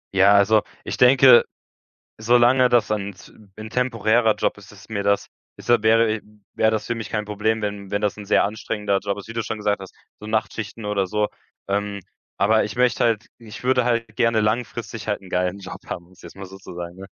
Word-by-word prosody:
Ja, 100 +1 +6
also, 105 +2 +4 0.2
ich - - -5
denke, 125 -1 +7 0.8
solange 120 +3 +4
das 120 -4 +2
ein 100 -1 -3
z - - -16 0.2
'n 110 0 -8
temporärer 115 -2 +1
Job - - -1
ist, - - -15
ist - - -16
mir 105 -2 -3
das 100 0 +1 0.3
ist - - -13
da 120 -3 +4
wäre 110 0 +3 0.3
wäre 110 - +3
das 110 -1 -2
für 120 - -1
mich 115 -2 -6
kein 105 -1 -2
Problem, 105 +2 -1
wenn 100 -2 -4
wenn 100 - -1
das 105 -1 -1
'n 105 - -9
sehr 105 - +3
anstrengender 105 -1 -2
Job 100 0 -3
ist, 100 - -9
wie 115 - -8
du 115 0 -2
schon 110 - -4
gesagt 105 -1 -1
hast, 95 - -10 0.3
so 105 - -9
Nachtschichten 110 0 -3
oder 100 -2 -1
so. 105 +2 0 0.4
Ähm, 100 0 -2 0.4
aber 110 +2 +3
ich 105 - -5
möchte 125 0 +2
halt 115 -3 +1
ich 115 0 -11
würde 125 -1 +3
halt 115 -1 0
gerne 115 -1 +2
langfristig 110 0 -3
halt 105 - -1
'n 95 -2 -15
geilen 90 +2 -1
Job 95 -2 -9
haben, 85 - -6
um 90 - -23
es 90 - -20
jetzt - - -12
mal 100 0 -8
so 95 +1 -12
zu 95 - -11
sagen. 90 +2 -8
105 Hz, 220 wpm, -22 LUFS, 100-115 Hz, 0.8 s, denke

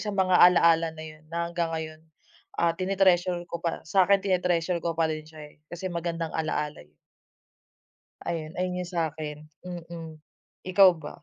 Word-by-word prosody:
sa 215 - -4
mga 185 -2 +3
ala-ala 170 -2 +6
na 155 0 -8
'yun 155 0 -11
na 170 +1 -2
hanggang 170 -1 -1
ngayon 160 -1 -5 0.6
ah 170 0 +2
tine-treasure 185 -1 +2
ko 170 - -5
pa 170 - -1
sa 190 +4 +4
'kin 200 0 +5
tine-treasure 180 -2 +1
ko 170 - 0
pa 165 - +2
rin 155 0 -4
siya 155 -1 -12
eh - - -27 0.2
kasi 175 +2 -5
magandang 170 -1 -3
alaala 150 -2 -2
eh. 75 - -30 1.3
Ayun, 160 -1 -4
ayun 180 0 -1
'yung 175 - -8
sa 165 -3 0
'kin 150 -1 -5 0.3
mm, 170 -2 -8 0.5
ikaw 185 -1 +6
ba? 160 +1 -10
170 Hz, 170 wpm, -27 LUFS, 160-180 Hz, 1.3 s, ala-ala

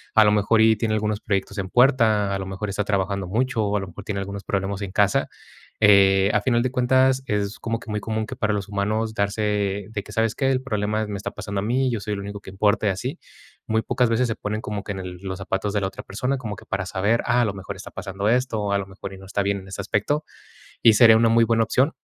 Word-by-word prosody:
A 110 -1 +7
lo 105 - +5
mejor, 105 +2 +3
y 110 0 +5
tiene 110 0 0
algunos 105 0 -1
proyectos 100 0 -2
en 95 -1 -3
puerta, 110 -5 +3
a - - -3
lo 95 - -4
mejor 95 +2 -4
está 100 +1 -1
trabajando 100 -1 -1
mucho, 115 +3 0
o 105 0 0
a - - 0
lo 95 - -6
mejor 95 +3 -10
tiene 100 -2 -3
algunos 100 +1 -6
problemas 100 +1 -2
en 95 - -5
casa. 100 0 +2 0.5
Eh, 100 -1 +6
a 105 - +3
final 120 +1 +2
de 130 - 0
cuentas, 130 +1 +3
es 105 0 -1
como 115 0 -2
que 115 - -13
muy 105 0 -2
común 110 +1 -2
que 130 - -6
para 110 -4 0
los 100 0 -3
humanos 105 +2 -1
darse 100 -1 -1
de 105 -2 -4
que: 105 - -12
"¿Sabes 110 +1 +1
qué? 135 -1 +1
El 130 -1 0
problema 110 -3 -1
me 105 - -4
está 95 - -5
pasando 100 -1 -4
a - - -2
mí 130 +5 +1
y - - 0
yo 115 - -2
soy 105 - -3
el 100 - -4
único 100 +1 -6
que 95 - -10
importa", 105 +3 +1
y - - +4
así. 125 - -4 0.5
Muy 110 0 +1
pocas 125 +2 +1
veces 115 +2 +2
se 115 - -2
ponen 105 +1 -3
como 105 -2 -4
que 105 - -5
en 95 - -6
el 90 -1 -7
los 95 -1 -5
zapatos 95 +1 -2
de 105 - 0
la 95 - 0
otra 95 - -8
persona, 125 +7 -2
como 110 -5 -5
que - - -13
para 95 -1 -3
saber: 100 +5 +1
"Ah, 125 - +3
a - - +3
lo 105 - -2
mejor 95 0 -7
está 95 - -9
pasando 95 +1 -4
esto 125 -2 +1
o 100 -1 -1
a - - +3
lo 100 - -4
mejor 95 0 -9
y - - -9
no 95 - -12
está 100 - -1
bien 100 0 0
en 95 - -13
ese 95 - -5
aspecto". 145 +9 0 0.6
Y 115 - +7
sería 110 0 +7
una 115 0 +4
muy 115 0 +5
buena 115 0 +2
opción 135 +7 +1
105 Hz, 275 wpm, -23 LUFS, 100-115 Hz, 0.6 s, A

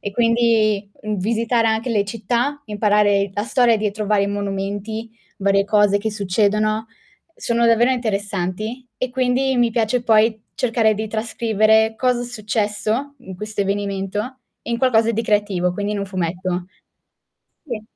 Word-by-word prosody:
E 205 - -4
quindi, 225 -3 +2
uhm, 215 -1 -2
visitare 230 +3 +1
anche 220 +3 -1
le 210 -3 +2
città, 240 +7 -2
imparare 205 -2 +2
la 205 - -1
storia 245 -2 +3
dietro 210 0 -2
vari 200 -1 +2
monumenti, 205 +2 -4 0.3
varie 195 0 +2
cose 205 -1 +3
che 220 +2 -2
succedono, 215 +2 0 0.5
sono 235 0 +1
davvero 230 +2 +4
interessanti 215 0 -2
e 255 -1 -3
quindi 260 +1 +1
mi 240 -1 +3
piace 235 +1 0
poi 220 -1 +3
cercare 225 -3 +2
di 215 +1 -4
trascrivere, 220 0 +2
cosa 250 -1 +1
è - - -4
successo 215 +3 -2
in 190 -7 -10
questo 210 +1 -4
avvenimento, 200 +4 -3 0.2
in 235 0 -2
qualcosa 230 -3 +3
di 230 +1 -1
creativo, 205 -4 +1
quindi 205 +2 -3
in 210 - -2
un 200 - -3
fumetto. 180 -1 -3 1.0
Sì. 230 -5 -5
215 Hz, 145 wpm, -20 LUFS, 200-230 Hz, 1.0 s, davvero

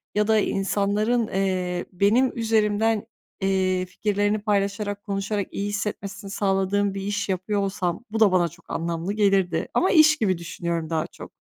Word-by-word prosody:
Ya 210 0 +2
da 220 -1 +4
insanların, 210 +4 0
eee, 185 -2 -1
benim 215 +8 +3
üzerimden, 220 -1 +1 0.4
eee, 185 -1 +1
fikirlerini 205 +2 0
paylaşarak, 205 0 -1
konuşarak 200 0 -2
iyi 200 +1 -3
hissetmesini 200 -1 -4
sağladığım 195 0 +1
bir 195 - -4
iş 205 +1 -2
yapıyor 195 +2 -1
olsam, 190 0 -2
bu 225 - -2
da 210 -4 +6
bana 180 -2 +3
çok 170 +1 -16
anlamlı 170 +3 -2
gelirdi 195 -5 +2
ama 370 - +2
iş 310 -2 +6
gibi 190 -5 +1
düşünüyorum 170 -1 -4
daha 160 -1 -1
çok. - - -12
200 Hz, 150 wpm, -24 LUFS, 185-210 Hz, 0.4 s, da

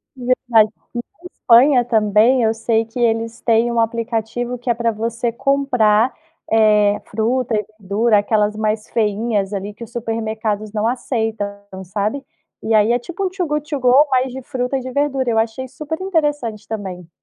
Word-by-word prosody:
Verdade. 245 -3 +2 0.2
Aqui 240 - -5 0.2
na - - -15
Espanha 245 +1 +5
também, 220 +2 +3
eu 220 0 +2
sei 225 0 0
que 230 +3 -8
eles 230 0 0
têm 230 0 +2
um 235 - 0
aplicativo 230 +1 -2
que 245 +1 -6
é - - +4
para 230 0 0
você 230 +2 -2
comprar, 250 -3 +2 0.4
eh, 210 -2 +4
fruta 230 +3 -1
e 210 -1 -1
verdura 210 +3 +2
aquelas 210 0 +1
mais 215 0 -2
feinhas, 210 -2 0
ali 200 +1 -4
que 215 - -10
o 230 - -8
supermercados 220 -2 -3
não 215 0 -1
aceitam, 225 -4 -2 0.4
sabe? 210 +9 -2 0.4
E 225 - -1
aí 215 +1 +4
é 240 - +2
tipo, 345 +9 -6
um - - 0
Too 365 -2 -3
Good 300 0 -3
to 290 -3 -2
Go, 255 +3 +5
mas 260 0 +1
de 265 - -6
fruta 250 0 -2
e - - -4
de 255 0 -6
verdura, 270 -2 0
eu 225 -1 +2
achei 225 +4 -2
super 305 +5 -6
interessante 295 - -1
também. 190 -6 -6
230 Hz, 180 wpm, -19 LUFS, 215-255 Hz, 0.4 s, Espanha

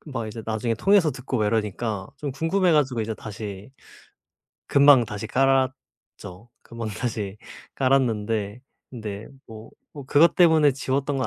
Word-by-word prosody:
그 - - -16
막 115 -4 -4
이제 110 +1 -8
나중에 110 +1 -2
통해서 190 - +3
듣고 130 -1 -4
막 105 - +1
이러니까 105 -2 -2
좀 145 0 -5
궁금해 170 +5 +1
가지고 135 -6 +1
이제 110 0 -3
다시 105 -1 -8 1.0
금방 140 -3 +6
다시 105 0 -6
깔았죠. 130 -6 -2
금방 115 -1 -7
다시 105 -2 -4 0.4
깔았는데 115 -5 0 0.3
근데 110 -4 -7 0.2
뭐, 110 0 -12 0.2
뭐 145 -2 -9
그것 160 +5 +4
때문에 160 -5 +5
지웠던 135 +1 -2
건 130 - -1
120 Hz, 300 characters per minute, -24 LUFS, 110-140 Hz, 1.0 s, 금방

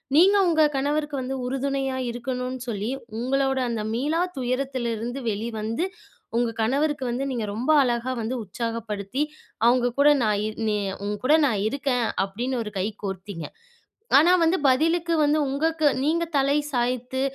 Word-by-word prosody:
நீங்க 385 +6 +6
உங்க 320 -2 +4
கணவருக்கு 295 +2 -1
வந்து 260 +1 -3
உறுதுணையா 270 0 -1
இருக்கணுன்னு 250 +1 -4
சொல்லி, 210 0 -2 0.3
உங்களோட 270 +2 +1
அந்த 225 -2 -2
மீளா 295 +8 0 0.2
துயரத்திலருந்து 250 -2 -2
வெளி 215 +2 -2
வந்து, 230 +10 -1 0.5
உங்க 240 -1 +2
கணவருக்கு 275 +4 +1
வந்து 250 +3 -2
நீங்க 235 -3 -2
ரொம்ப 250 +7 +1
அழகா 240 0 -1
வந்து 230 +4 -2
உற்சாகப்படுத்தி, 225 +3 -3 0.4
அவுங்க 245 0 +3
கூட 290 - +7
நான் 210 -1 +1 0.2
"நீ 210 - +1 0.3
உன்கூட 210 +8 +1
நான் 215 -6 0
இருக்கேன்." 265 -2 0 0.2
அப்பிடின்னு 240 +5 -3
ஒரு 210 -1 -7
கை 190 - 0 0.2
கோர்த்தீங்க. 190 -3 -5 0.7
ஆனா 325 +5 +6
வந்து 330 +3 +3
பதிலுக்கு 330 +6 +2
வந்து 295 +1 +3
உங்களுக்கு 315 +2 +1 0.2
நீங்க 325 +4 +1
தலை 275 +1 +3 0.2
சாய்த்து 250 +1 -1
255 Hz, 140 wpm, -25 LUFS, 230-280 Hz, 0.7 s, கூட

